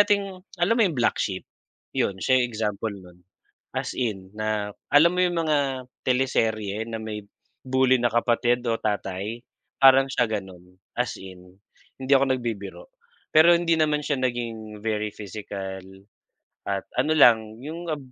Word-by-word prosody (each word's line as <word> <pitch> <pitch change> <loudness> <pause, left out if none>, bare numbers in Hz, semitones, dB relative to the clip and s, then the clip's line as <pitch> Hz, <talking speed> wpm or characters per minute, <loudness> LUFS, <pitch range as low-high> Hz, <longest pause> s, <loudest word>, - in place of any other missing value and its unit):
nating 205 -1 +4 0.3
alam 175 +7 +2
mo 235 - +1
'yung 170 -9 +1
black 120 - +1
sheep? 95 -2 -2 0.5
'Yun 95 - 0
siya 130 +6 +3
'yung 125 - +1
example 110 -1 -2
'non, 90 -2 -14 0.5
as - - -4
in 105 -7 -2
na, 105 -1 -2 0.2
alam 165 +5 +6
mo 180 - +3
'yung 175 -2 +1
mga 135 -4 0 0.2
teleserye 110 -5 0
na 110 - -4
may 105 -1 -6 0.4
bully 130 0 +3
na 120 - +2
kapatid 120 +1 +2
o 115 - +2
tatay, 105 0 -3 0.4
parang 135 0 +6
siya 120 -2 +1
gano'n, 95 -4 -7 0.2
as 125 - 0
in 90 -1 -12 0.4
hindi 130 +1 -5
ako 135 -1 +4
nagbibiro. 120 - -6 0.4
Pero 165 +3 +7
hindi 170 -1 +1
naman 150 -1 +1
siya 145 -2 -1
naging 115 -4 -4
very 105 -1 -1
physical, 100 -2 -6 0.9
at 100 -1 -2 0.2
ano 155 +3 +1
lang 110 -5 +5
'yung 165 +2 -6
ab 155 - -1
120 Hz, 150 wpm, -25 LUFS, 105-140 Hz, 0.9 s, Pero